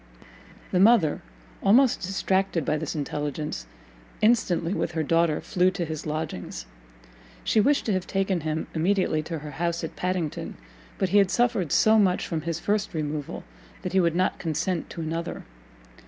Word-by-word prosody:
The 180 - +2
mother, 195 -7 +5 0.4
almost 240 +6 +4
distracted 190 -3 0
by 150 - +1
this 155 0 -3
intelligence, 145 - -3 0.5
instantly, 200 -6 +2
with 175 - -2
her 160 -1 0
daughter, 165 0 +2
flew 180 0 +2
to 180 -2 -3
his 155 -1 -5
lodgings. 155 - -4 0.8
She 220 - +3
wished 280 +6 +2
to 215 - +1
have 185 -1 -2
taken 195 -2 0
him 155 +1 -2
immediately 170 -1 +1
to 165 +1 -5
her 150 0 -8
house 170 +3 -2
at 160 - -5
Padington, 180 -4 -3 0.4
but 190 - 0
he 205 +3 +5
had 195 -2 +4
suffered 230 - +1
so 220 0 +5
much 185 -3 +2
from 165 -2 -3
his 165 +1 -3
first 205 -2 -1
removal, 150 -2 -3 0.4
that 185 - -4
he 190 - +4
would 170 -2 +2
not 185 +1 +1
consent 165 +1 -2
to 170 - -6
another. 165 +1 -4
170 Hz, 165 wpm, -26 LUFS, 155-195 Hz, 0.8 s, mother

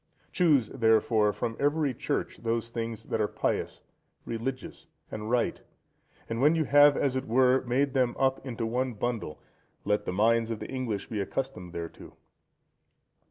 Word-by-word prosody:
Choose, 150 - +3
therefore, 110 -1 +3
from 115 +2 -3
every 145 -1 +1
Church - - -3
those 115 0 -2
things 115 -1 -4
that 110 - -2
are 105 - +2
pious, - - -2 0.4
religious, 125 +3 -5 0.2
and 110 0 -5
right, 120 0 0 0.7
and 115 +1 -3
when 150 +4 +5
you 160 - +2
have, 145 0 +6
as 135 -2 +1
it 130 0 -2
were, 130 +2 +4
made 135 +3 +1
them 125 -3 +1
up 135 0 +1
into 120 -3 -4
one 125 +1 -1
bundle, 105 -8 -3 0.5
let 105 0 +1
the - - -2
minds 115 +4 +2
of 115 - -2
the - - -7
English 125 -6 -3
be 105 -3 -2
accustomed 100 -5 -4
thereto. 85 -1 -8
120 Hz, 160 wpm, -28 LUFS, 110-135 Hz, 0.7 s, have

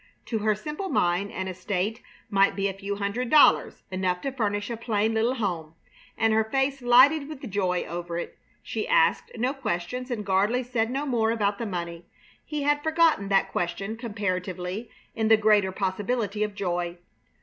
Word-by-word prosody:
To 225 - -2
her 215 0 +2
simple 300 - -5
mind 180 - +1
an 190 0 -4
estate 190 +4 -2 0.3
might 195 0 +4
be 195 0 0
a 195 - -3
few 200 +1 -4
hundred 205 +5 -2
dollars, 300 +2 +5
enough 185 -1 0
to 275 - -2
furnish 205 -3 -2
a - - -2
plain 220 -1 0
little 230 +3 +1
home; 170 -8 -3 0.4
and 225 0 +3
her 220 0 +4
face 270 +4 -1
lighted 275 +5 +5
with 275 -4 -7
joy 185 -2 0
over 170 0 -5
it. 175 - -5 0.3
She - - -3
asked - - +3
no 250 +4 0
questions, 250 0 -3
and 220 -4 -3
Gardley 205 +6 +2
said 235 -2 -1
no 275 +4 -2
more 235 -5 +1
about 205 -3 0
the 230 - -3
money. 170 -2 -5 0.4
He 300 -2 -4
had 290 0 +2
forgotten 315 -10 +2
that 195 -1 +2
question, 185 +5 -2
comparatively, 200 -2 -3 0.2
in 220 -1 0
the 220 0 +6
greater 210 -3 +3
possibility 205 +3 -2
of 210 -1 -3
joy. 175 -3 -2
210 Hz, 175 wpm, -26 LUFS, 190-245 Hz, 0.4 s, the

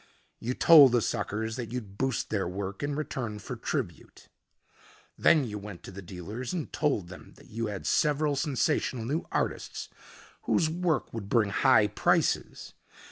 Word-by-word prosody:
You 125 +3 -3
told 145 -7 +8
the 120 - +4
suckers 110 +2 -2
that 120 -3 -5
you'd 110 -6 -6
boost 130 -3 -1
their 100 -4 0
work 95 +1 -5
in 145 0 -2
return 130 -7 -4
for 115 +5 -7
tribute. 115 - -5 0.9
Then 155 -4 +4
you 105 -4 -5
went 100 -3 -9
to - - -9
the 100 +1 -8
dealers 100 - -6
and 170 -4 -4
told 135 - 0
them 90 - -12
that - - -18
you 115 +1 -2
had 100 -3 -6
several 150 0 +2
sensational 130 -4 0
new 150 +7 -2
artists - - -3 0.6
whose 160 -2 +2
work 170 -5 -1
would 105 -4 -6
bring 110 -4 +2
high 115 -1 +5
prices. 105 - 0
115 Hz, 160 wpm, -28 LUFS, 100-140 Hz, 0.9 s, told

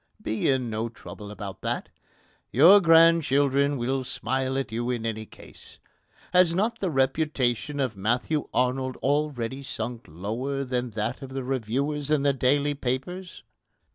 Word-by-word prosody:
Be 110 +5 -1
in 130 -2 +1
no 110 +2 -2
trouble 105 -2 -10
about 100 -1 -8
that. - - -3 0.6
Your 175 - +8
grandchildren 145 -4 +4
will 130 +2 -1
smile 130 +1 -2
at 135 -5 -3
you 120 +2 -2
in 120 -2 -2
any 110 -1 -3
case. - - -14 0.6
Has 180 -2 +5
not 225 +5 0
the 190 - -1
reputation 135 -2 0
of 130 -5 -1
Matthew 120 +9 -1
Arnold 130 +1 0
already 140 -3 -1
sunk 120 -2 -5
lower 115 - -3
than 125 -1 -2
that 110 +6 -2
of 135 - -7
the 135 -1 -3
reviewers 135 +4 -2
in 150 -2 +2
the 140 -1 +3
daily 140 +3 +2
papers? 145 +8 -4
130 Hz, 145 wpm, -26 LUFS, 120-145 Hz, 0.6 s, Your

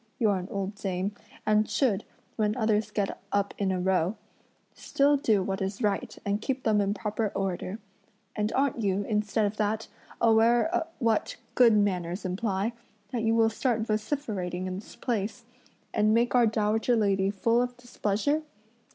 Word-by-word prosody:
You're 205 -4 +2
an 180 - -6
old 195 0 -3
dame, 190 -1 -2 0.3
and 215 0 +3
should, 220 -7 +1 0.3
when 210 -1 +1
others 220 -2 +1
get 200 -2 -2
up 200 0 0
a 200 - 0
row, 185 0 +1 0.6
still 285 +1 +2
do 220 -8 +2
what 195 0 -3
is 195 +4 -3
right 205 -2 -1
and 200 +1 0
keep 265 +2 -2
them 215 -2 +3
in 200 +1 0
proper 215 +1 -1
order; 195 +1 -2 0.6
and 210 +1 0
aren't 270 -2 +1
you, 200 -1 +1
instead 210 0 0
of 205 +1 -2
that, 215 +1 -1 0.3
aware 235 +9 +3
what 230 -4 +1 0.2
good 235 -4 +6
manners 185 -2 0
imply, 195 +3 -1 0.4
that 240 -3 -1
you 225 0 +2
will 225 -1 +4
start 230 0 0
vociferating 215 -5 -2
in 185 0 -3
this 210 - -13
place, 230 0 -3 0.5
and 215 0 +3
make 235 +1 +2
our 245 -2 +5
dowager 220 +2 +1
lady 195 -3 +2
full 230 +4 +2
of 245 0 -3
displeasure? 245 +4 -1
215 Hz, 160 wpm, -28 LUFS, 195-230 Hz, 0.6 s, good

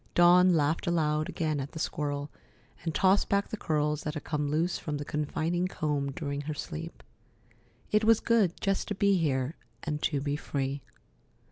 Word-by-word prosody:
Dawn 175 +1 +6
laughed 150 +3 +1
aloud 155 -2 +1
again 155 -3 -1
at 135 0 -5
the - - -7
squirrel, 145 -2 -2 0.5
and 165 -2 -2
tossed 195 +1 +3
back 200 0 +1
the - - -3
curls 150 -5 0
that 150 +1 -4
had 150 - -5
come 150 -2 -1
loose 165 +4 0
from 150 -2 -3
the 145 - -5
confining 160 +5 -1
comb 145 -5 -1
during 140 -1 -3
her 150 +1 -4
sleep. 165 +3 -7 0.9
It 210 +1 +3
was 225 0 +5
good 215 -7 +2
just 195 -1 0
to 205 - -2
be 200 0 +3
here 140 -4 0 0.3
and 150 -2 -3
to 145 - +1
be 145 +1 -1
free. 140 -2 -3
155 Hz, 175 wpm, -29 LUFS, 145-175 Hz, 0.9 s, Dawn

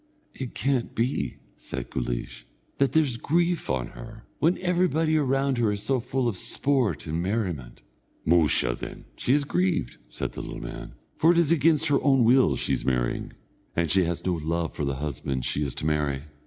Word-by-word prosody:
"It 130 -3 -6
can't 135 -3 0
be," 115 - -1 0.2
said - - -7
Guleesh, - - -4 0.3
"that 135 -1 +2
there's 145 -7 +2
grief 170 +6 0
on 65 -2 -1
her, 110 -1 -11
when 170 +4 +3
everybody 175 -3 +1
round 135 -2 +1
her 110 -3 +3
is 100 0 -4
so 135 -2 +1
full 125 +1 -1
of 110 -5 -1
sport 135 +1 +1
and 80 +1 -2
merriment." 90 - -3 0.4
"Musha, 80 -7 +3
then, - - -8
she 130 - +2
is 145 - +2
grieved," 175 - 0
said - - -4
the - - -5
little - - -7
man; - - -8 0.2
"for 170 +2 +4
it's 170 -2 +3
against 160 -1 +4
her 140 - +3
own 135 -3 +4
will 125 +3 +5
she's - - -1
marrying, 60 -2 -1 0.4
and 85 -1 +1
she 95 -2 +4
has 85 0 -3
no 90 - +2
love 85 +1 -2
for 75 - -3
the 70 -1 -1
husband 65 -2 -3
she 75 - -1
is 70 -3 -2
to - - -4
marry. 75 -3 0
115 Hz, 180 wpm, -26 LUFS, -, 0.4 s, will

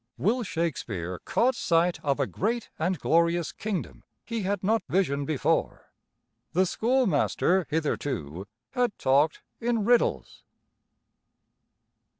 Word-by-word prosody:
Will 235 +7 +1
Shakespeare 110 - -3
caught 255 +2 +2
sight 170 -3 +1
of 140 -1 0
a 140 - +2
great 225 - -2
and 180 +3 0
glorious 170 0 +2
kingdom 205 -6 -5 0.2
he 230 -2 -3
had 195 0 -2
not 220 +3 +2
visioned 140 -7 +1
before. 155 -4 -1 0.6
The 185 +2 +3
schoolmaster 220 - +1
hitherto 130 - -2 0.2
had 245 -5 0
talked 140 +4 +2 0.2
in 230 -3 0
riddles. 240 +1 +1
175 Hz, 110 wpm, -27 LUFS, 145-220 Hz, 0.6 s, The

